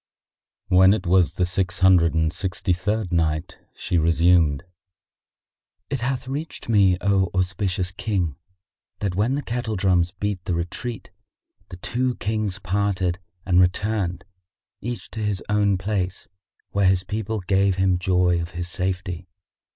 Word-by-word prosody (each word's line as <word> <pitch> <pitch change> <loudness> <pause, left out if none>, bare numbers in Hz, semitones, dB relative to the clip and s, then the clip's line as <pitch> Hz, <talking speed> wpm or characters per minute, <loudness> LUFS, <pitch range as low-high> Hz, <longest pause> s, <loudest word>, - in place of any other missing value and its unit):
When 95 +1 +6
it 95 - -5
was 90 -1 +3
the 90 - +1
Six 90 0 -1
Hundred 90 -3 +5
and 80 0 +1
Sixty 95 0 -1
third 100 +2 -2
Night, 80 -1 -1 0.2
She 90 - 0
resumed, 80 -3 +3 1.3
It 135 - -1
hath 130 +1 -2
reached 145 +5 -5
me, 100 -5 +4
O 95 -1 +2
auspicious 95 0 -1
King, 95 -6 -2 0.6
that 100 -3 -2
when 110 +8 +1
the 145 - -3
kettle 120 -2 -3
drums 90 -3 +2
beat 100 0 -4
the 90 - -1
retreat, 90 +6 -5 0.6
the 90 - -8
two 125 +6 -1
Kings 105 -3 -2
parted 95 -1 -1 0.3
and 90 -1 +4
returned, 95 0 0 0.6
each 120 -4 -6
to 110 - -6
his 105 -3 -1
own 100 -2 +2
place 95 -2 -3 0.4
where 100 -1 +2
his 95 -1 +3
people 110 +2 -3
gave 95 +1 +2
him 95 -1 +2
joy 90 -1 +2
of 85 +2 -6
his 90 -1 -3
safety. 90 0 -3
95 Hz, 145 wpm, -23 LUFS, 90-105 Hz, 1.3 s, When